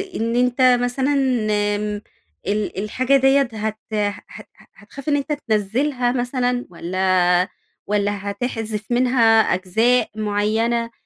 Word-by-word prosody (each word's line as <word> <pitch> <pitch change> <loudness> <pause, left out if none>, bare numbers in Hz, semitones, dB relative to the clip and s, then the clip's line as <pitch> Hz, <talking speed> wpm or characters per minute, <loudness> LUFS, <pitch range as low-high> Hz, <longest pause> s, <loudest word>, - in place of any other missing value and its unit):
إن 230 +1 -1
أنتَ 250 +1 +1 0.2
مثلًا 260 +3 0 0.6
آمم 210 0 -3 0.5
ال 205 -1 -2
الحاجة 255 +6 +2
دِيَّة 270 +1 +4
هت 215 0 -3 0.2
هت 205 -1 -4 0.3
هتخاف 265 +7 -9
إن 290 - +3
أنتَ 285 +2 -2 0.2
تنزلها 245 +5 0
مثلًا 245 0 -1
واَّلا 180 +1 +1 0.4
والَّا 205 -1 -1
هتحذف 220 -1 -4
منها 240 -3 +4
أجزاء 220 +7 +1
معينة، 220 +3 0
225 Hz, 110 wpm, -21 LUFS, 205-250 Hz, 0.6 s, دِيَّة